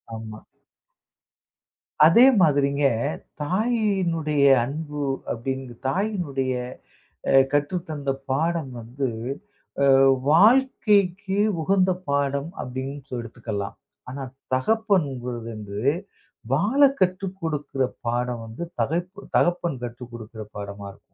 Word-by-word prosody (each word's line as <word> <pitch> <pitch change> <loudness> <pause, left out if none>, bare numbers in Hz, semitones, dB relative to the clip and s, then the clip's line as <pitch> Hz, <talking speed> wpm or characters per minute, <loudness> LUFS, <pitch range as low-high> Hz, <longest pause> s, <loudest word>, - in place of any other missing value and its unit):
ஆமா. 110 -1 -8 1.7
அதே 200 +10 +7 0.2
மாதிரிங்க, 140 -2 +3 0.6
தாயினுடைய 185 -6 +1 0.2
அன்பு 145 +2 -4 0.3
அப்படின்னு, 130 +1 -4
தாயினுடைய 145 -7 -1 0.8
அ - - +3 0.2
கற்று 145 +5 +1
தந்த 145 -3 -3 0.2
பாடம் 160 0 0
வந்து 125 +4 -3 0.9
அ - - +4 0.3
வாழ்க்கைக்கு 205 -2 +4 0.2
உகந்த 190 +1 +3 0.2
பாடம் 140 +2 0
அப்படின்னு 130 +3 -5
சொ - - -6
எடுத்துக்கலாம். 110 -4 -5 0.3
ஆனா, 135 0 -5 0.3
தகப்பன்குறது 135 - 0
வந்து 105 -1 -6 0.7
வாழ 210 - +2 0.2
கற்று 185 +1 +1
கொடுக்கிற 145 -4 -2 0.3
பாடம் 120 0 -1
வந்து 115 +10 -6 0.2
தகப் 170 +9 0 0.3
தகப்பன் 175 -6 +1
கற்று 120 +1 -6
கொடுக்குற 110 -1 -8
பாடமா 100 0 -7
இருக்கும். 100 - -21
140 Hz, 95 wpm, -24 LUFS, 125-180 Hz, 1.7 s, அதே